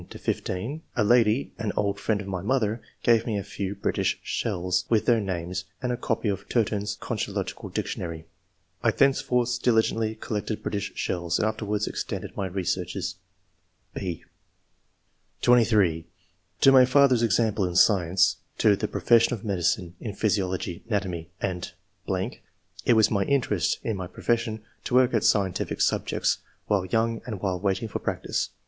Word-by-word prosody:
13 -, -, -10 dB
15, 115 Hz, +13 st, -3 dB
a 120 Hz, -, +2 dB
lady, 115 Hz, +2 st, +3 dB
an 110 Hz, -2 st, -1 dB
old 100 Hz, 0 st, 0 dB
friend 105 Hz, -2 st, 0 dB
of 100 Hz, -, -8 dB
my 95 Hz, -2 st, -3 dB
mother, 110 Hz, 0 st, 0 dB, 0.2 s
gave 115 Hz, -1 st, +4 dB
me 110 Hz, -3 st, 0 dB
a 100 Hz, -, -3 dB
few 100 Hz, 0 st, -4 dB
British 100 Hz, -, 0 dB
shells, 90 Hz, +1 st, -1 dB
with 110 Hz, -2 st, +2 dB
their 120 Hz, -2 st, +4 dB
names, 90 Hz, -1 st, -3 dB
and 125 Hz, -, -2 dB
a -, -, 0 dB
copy 115 Hz, -2 st, -2 dB
of 100 Hz, 0 st, -3 dB
*Turton's 105 Hz, -3 st, 0 dB
Concho -, -, -3 dB
logical -, -, -4 dB
Dictionary.' 85 Hz, -2 st, -4 dB, 0.6 s
I -, -, +3 dB
thenceforth 125 Hz, -3 st, +2 dB
diligently 110 Hz, -2 st, +2 dB
collected 110 Hz, 0 st, -4 dB
British 100 Hz, -2 st, -2 dB
shells, 85 Hz, -1 st, -1 dB
and 110 Hz, -, +1 dB
afterwards 105 Hz, -1 st, -1 dB
extended -, -, -5 dB
my 95 Hz, -, -2 dB
researches." 90 Hz, 0 st, -2 dB, 0.8 s
(6) 90 Hz, -4 st, -4 dB, 1.2 s
(23) 105 Hz, -9 st, +4 dB, 0.3 s
" 95 Hz, 0 st, -40 dB
To 135 Hz, -, +8 dB
my 130 Hz, -1 st, +8 dB
father's 130 Hz, -2 st, +4 dB
example 110 Hz, -2 st, +2 dB
(in 90 Hz, -1 st, -3 dB
science); 90 Hz, -2 st, +4 dB, 0.2 s
to 105 Hz, -2 st, +4 dB
the -, -, -2 dB
profession 115 Hz, +1 st, +3 dB
of 110 Hz, 0 st, -11 dB
medicine 90 Hz, -2 st, 0 dB
(in 105 Hz, -5 st, -6 dB
physiology, 95 Hz, -5 st, -1 dB
ana 105 Hz, -3 st, +2 dB
tomy, 85 Hz, -3 st, -5 dB
and 90 Hz, -2 st, -3 dB, 0.6 s
....). -, -, -19 dB
It -, -, +6 dB
was 110 Hz, -1 st, +4 dB
my 100 Hz, -3 st, +2 dB
interest 115 Hz, -, +1 dB
in 110 Hz, -3 st, -2 dB
my 95 Hz, -1 st, -4 dB
profession 115 Hz, +2 st, -1 dB, 0.2 s
to 125 Hz, -, -1 dB
work 125 Hz, -1 st, +5 dB
at 115 Hz, -, +2 dB
scientific 95 Hz, -3 st, +1 dB
subjects, -, -, +1 dB, 0.3 s
while 100 Hz, -3 st, +1 dB
young 115 Hz, +4 st, 0 dB
and 110 Hz, -5 st, -4 dB
while 95 Hz, -2 st, -1 dB
waiting 100 Hz, +4 st, 0 dB
for 105 Hz, -, -4 dB
practice. -, -, -2 dB
105 Hz, 160 wpm, -26 LUFS, 95-115 Hz, 1.2 s, To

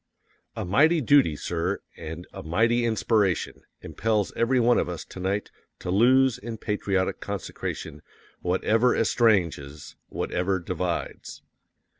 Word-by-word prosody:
_A -, -, -3 dB
MIGHTY 155 Hz, -, +4 dB
DUTY, 135 Hz, -, +4 dB
SIR, 85 Hz, +3 st, -2 dB, 0.2 s
AND 80 Hz, +2 st, -7 dB
A -, -, -7 dB
MIGHTY 115 Hz, +9 st, +1 dB
INSPIRATION 110 Hz, -5 st, 0 dB, 0.2 s
impels 105 Hz, -2 st, -1 dB
every 125 Hz, +2 st, +2 dB
one 120 Hz, 0 st, +4 dB
of -, -, -1 dB
us 85 Hz, -2 st, -6 dB
to -, -, -11 dB
night 95 Hz, +3 st, -2 dB, 0.3 s
to 90 Hz, -, -5 dB
lose 130 Hz, +5 st, +4 dB
in 115 Hz, +1 st, -6 dB
patriotic 100 Hz, -3 st, -1 dB
consecration 75 Hz, -1 st, -5 dB, 0.4 s
WHATEVER 110 Hz, +7 st, +2 dB
ESTRANGES, 85 Hz, -, +1 dB
WHATEVER 95 Hz, +2 st, -1 dB
DIVIDES. 90 Hz, 0 st, -4 dB
100 Hz, 120 wpm, -26 LUFS, 90-115 Hz, 0.4 s, MIGHTY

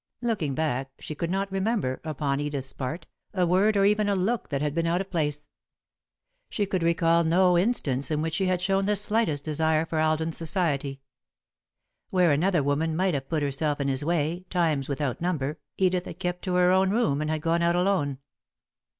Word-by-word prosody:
Looking 185 Hz, -, -1 dB
back, 135 Hz, -4 st, -1 dB
she -, -, -6 dB
could 165 Hz, +3 st, -3 dB
not 195 Hz, +2 st, -1 dB
remember, 195 Hz, -, -1 dB
upon 145 Hz, -3 st, -2 dB
Edith's 145 Hz, -3 st, -4 dB
part, 140 Hz, +6 st, -5 dB, 0.3 s
a 180 Hz, -2 st, +2 dB
word 195 Hz, +5 st, +3 dB
or 195 Hz, -, +4 dB
even 210 Hz, 0 st, +2 dB
a 200 Hz, -, +2 dB
look 210 Hz, +6 st, -1 dB
that 140 Hz, -, -1 dB
had 150 Hz, 0 st, -1 dB
been 165 Hz, +1 st, 0 dB
out 170 Hz, +2 st, +1 dB
of 195 Hz, 0 st, -5 dB
place. 150 Hz, -3 st, -1 dB, 1.0 s
She 205 Hz, -, -1 dB
could 190 Hz, -2 st, -2 dB
recall 170 Hz, 0 st, +3 dB
no 180 Hz, +2 st, +4 dB
instance 175 Hz, -, +1 dB
in 155 Hz, -1 st, 0 dB
which 160 Hz, +1 st, -2 dB
she 190 Hz, +3 st, 0 dB
had 180 Hz, -1 st, 0 dB
shown 195 Hz, +1 st, +1 dB
the 210 Hz, -, +2 dB
slightest 205 Hz, -8 st, 0 dB
desire 160 Hz, +1 st, +1 dB
for 160 Hz, -1 st, -2 dB
Alden's 155 Hz, +1 st, +1 dB
society. 150 Hz, -5 st, -1 dB, 1.1 s
Where 180 Hz, -3 st, +3 dB
another 170 Hz, +2 st, +2 dB
woman 155 Hz, +3 st, 0 dB
might 185 Hz, +1 st, +1 dB
have 135 Hz, -2 st, -3 dB
put 155 Hz, -3 st, 0 dB
herself 145 Hz, +1 st, -1 dB
in 140 Hz, -1 st, 0 dB
his 135 Hz, +1 st, 0 dB
way, 170 Hz, +2 st, 0 dB
times 155 Hz, -6 st, 0 dB
without 140 Hz, -1 st, -2 dB
number, 155 Hz, -4 st, -2 dB, 0.2 s
Edith 185 Hz, -1 st, +1 dB
had -, -, -8 dB
kept 180 Hz, -1 st, -3 dB
to 180 Hz, -1 st, -1 dB
her 180 Hz, 0 st, +4 dB
own 190 Hz, +1 st, +3 dB
room, 170 Hz, -10 st, +1 dB
or 155 Hz, -, -2 dB
had 155 Hz, 0 st, -1 dB
gone 170 Hz, +1 st, +1 dB
out 170 Hz, 0 st, +2 dB
alone. 175 Hz, -7 st, +1 dB
165 Hz, 195 wpm, -26 LUFS, 145-185 Hz, 1.1 s, or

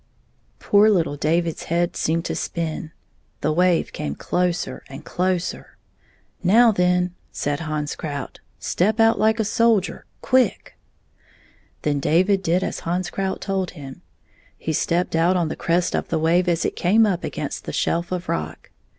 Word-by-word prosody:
Poor 210 Hz, +1 st, +4 dB
httle 165 Hz, -8 st, +1 dB
David's 165 Hz, +2 st, 0 dB
head 170 Hz, +1 st, 0 dB
seemed 165 Hz, +2 st, 0 dB
to -, -, -2 dB
spin. 160 Hz, -2 st, -4 dB, 0.5 s
The 155 Hz, -, +1 dB
wave 175 Hz, +1 st, +2 dB
came 70 Hz, -1 st, -4 dB
closer 175 Hz, -7 st, -2 dB
and 135 Hz, +3 st, -10 dB
closer. 180 Hz, -1 st, -2 dB, 0.3 s
" -, -, -34 dB, 0.3 s
Now, 225 Hz, +6 st, +6 dB
then," 180 Hz, -2 st, +1 dB, 0.2 s
said 145 Hz, 0 st, -2 dB
Hans 155 Hz, -2 st, -3 dB
Krout, 145 Hz, -4 st, -6 dB, 0.2 s
"step 215 Hz, +5 st, 0 dB
out 225 Hz, 0 st, +4 dB
hke 220 Hz, +1 st, +3 dB
a 220 Hz, -, +1 dB
soldier 220 Hz, -2 st, +1 dB
— -, -, -40 dB
quick!" 260 Hz, -2 st, +1 dB, 1.1 s
Then 145 Hz, -1 st, +1 dB
David 185 Hz, +7 st, +2 dB
did 180 Hz, +1 st, +1 dB
as -, -, -3 dB
Hans 175 Hz, +2 st, -2 dB
Krout 190 Hz, -1 st, -2 dB
told 190 Hz, -2 st, -1 dB
him. 135 Hz, -2 st, -9 dB, 0.6 s
He 160 Hz, -, -3 dB
stepped 170 Hz, +3 st, 0 dB
out 170 Hz, +3 st, +3 dB
on 170 Hz, -3 st, 0 dB
the -, -, -4 dB
crest 175 Hz, +1 st, 0 dB
of -, -, -2 dB
the 165 Hz, -, -1 dB
wave 170 Hz, +3 st, +2 dB
as 170 Hz, -1 st, +1 dB
it -, -, -2 dB
came 215 Hz, +6 st, +4 dB
up 185 Hz, -4 st, -1 dB
against -, -, -4 dB
the -, -, -4 dB
shelf 170 Hz, +1 st, -1 dB
of 180 Hz, -1 st, -3 dB
rock. 80 Hz, +1 st, -4 dB
175 Hz, 165 wpm, -22 LUFS, 160-190 Hz, 1.1 s, Now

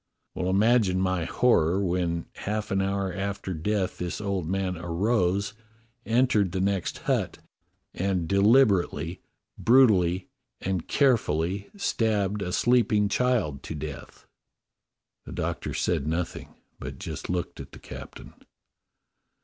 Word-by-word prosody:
Well, 90 Hz, -, -2 dB
imagine 100 Hz, -1 st, +3 dB
my 95 Hz, -3 st, 0 dB
horror 90 Hz, -4 st, +3 dB
when 85 Hz, -3 st, -1 dB
half 105 Hz, +1 st, -4 dB
an 95 Hz, 0 st, +2 dB
hour 95 Hz, -1 st, -1 dB
after 100 Hz, 0 st, -3 dB
death 95 Hz, +3 st, -1 dB
this 90 Hz, -1 st, -3 dB
old 100 Hz, -5 st, -2 dB
man 95 Hz, -1 st, -1 dB
arose, 90 Hz, +3 st, 0 dB, 0.5 s
entered 115 Hz, -6 st, +2 dB
the 95 Hz, -, -1 dB
next 95 Hz, -2 st, 0 dB
hut, -, -, 0 dB, 0.6 s
and 90 Hz, -3 st, -1 dB
deliberately, 100 Hz, -, +3 dB, 0.4 s
brutally, 100 Hz, -8 st, +4 dB, 0.3 s
and 95 Hz, -3 st, -2 dB
carefully 100 Hz, -, +1 dB
stabbed 105 Hz, -, 0 dB
a 90 Hz, -2 st, -3 dB
sleeping 110 Hz, -2 st, +3 dB
child 110 Hz, -, +1 dB
to 80 Hz, -, -6 dB
death." 75 Hz, -1 st, -8 dB, 1.0 s
The -, -, -8 dB
Doctor -, -, -3 dB
said 70 Hz, -, 0 dB
nothing, 85 Hz, +2 st, -3 dB, 0.2 s
but -, -, -7 dB
just -, -, -6 dB
looked 90 Hz, -1 st, -3 dB
at -, -, -9 dB
the -, -, -12 dB
captain. -, -, -10 dB
95 Hz, 120 wpm, -27 LUFS, 90-105 Hz, 1.0 s, brutally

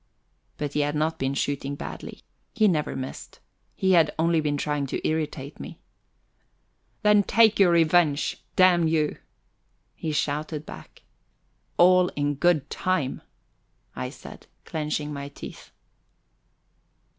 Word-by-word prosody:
But 145 Hz, -1 st, -4 dB
he -, -, 0 dB
had 145 Hz, +1 st, 0 dB
not 155 Hz, +2 st, -1 dB
been 135 Hz, +1 st, -1 dB
shooting 140 Hz, 0 st, -2 dB
badly. -, -, -8 dB, 0.3 s
He 215 Hz, -3 st, +4 dB
never 155 Hz, -6 st, 0 dB
missed. 130 Hz, 0 st, -7 dB, 0.4 s
He 190 Hz, -, +1 dB
had 165 Hz, -4 st, +5 dB
only 165 Hz, 0 st, +2 dB
been 145 Hz, -1 st, -1 dB
trying 145 Hz, -1 st, -2 dB
to -, -, -3 dB
irritate 150 Hz, -3 st, -3 dB
me. -, -, -8 dB, 1.3 s
"Then 210 Hz, -1 st, +5 dB
take 220 Hz, +1 st, +4 dB
your 195 Hz, -3 st, +6 dB
revenge, 165 Hz, -3 st, +3 dB, 0.2 s
damn 180 Hz, -3 st, +5 dB
you!" 155 Hz, -2 st, 0 dB, 0.8 s
he 160 Hz, -, -4 dB
shouted 150 Hz, +1 st, -2 dB
back. -, -, -12 dB, 0.7 s
"All 180 Hz, +1 st, +6 dB
in 145 Hz, 0 st, 0 dB
good 150 Hz, -1 st, +2 dB
time," 185 Hz, -8 st, -1 dB, 0.7 s
I 65 Hz, -1 st, -4 dB
said, -, -, -12 dB, 0.2 s
clenching 150 Hz, -1 st, -3 dB
my 140 Hz, 0 st, -5 dB
teeth. 145 Hz, -, -11 dB
155 Hz, 125 wpm, -25 LUFS, 145-175 Hz, 1.3 s, your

